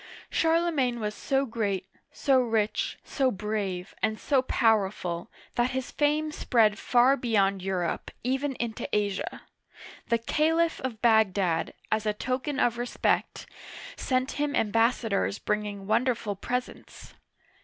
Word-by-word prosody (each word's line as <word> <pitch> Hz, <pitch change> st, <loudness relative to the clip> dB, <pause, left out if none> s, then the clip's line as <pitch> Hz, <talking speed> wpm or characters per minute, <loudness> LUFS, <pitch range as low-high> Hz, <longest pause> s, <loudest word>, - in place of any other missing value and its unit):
Charlemagne 320 Hz, -7 st, +2 dB
was 210 Hz, -1 st, -2 dB
so 270 Hz, +4 st, 0 dB
great, 205 Hz, -6 st, -2 dB, 0.3 s
so 270 Hz, -3 st, +3 dB
rich, 225 Hz, -3 st, 0 dB
so 270 Hz, -2 st, +1 dB
brave, 200 Hz, -4 st, -3 dB
and 220 Hz, -1 st, 0 dB
so 275 Hz, -3 st, +2 dB
powerful, 205 Hz, -7 st, +1 dB, 0.2 s
that 240 Hz, +1 st, +1 dB
his 260 Hz, -, -4 dB
fame 300 Hz, +1 st, +1 dB
spread 225 Hz, -7 st, +2 dB
far 250 Hz, +2 st, +4 dB
beyond 200 Hz, -7 st, +1 dB
Europe, 180 Hz, -2 st, -2 dB
even 265 Hz, +2 st, -1 dB
into 230 Hz, -2 st, -4 dB
Asia. 205 Hz, -2 st, -2 dB, 0.6 s
The 235 Hz, -, +3 dB
Caliph 320 Hz, +7 st, +1 dB
of 245 Hz, -4 st, -5 dB
Bagdad, 195 Hz, -7 st, +2 dB, 0.2 s
as 220 Hz, 0 st, 0 dB
a 210 Hz, -, +2 dB
token 255 Hz, +6 st, -2 dB
of 235 Hz, 0 st, +2 dB
respect, 245 Hz, 0 st, -1 dB, 0.5 s
sent 255 Hz, 0 st, 0 dB
him 295 Hz, -1 st, 0 dB
ambassadors 225 Hz, -2 st, +1 dB
bringing 210 Hz, -2 st, -3 dB
wonderful 230 Hz, -1 st, 0 dB
pres 250 Hz, +6 st, -2 dB
ents. -, -, -14 dB
230 Hz, 125 wpm, -27 LUFS, 210-260 Hz, 0.6 s, far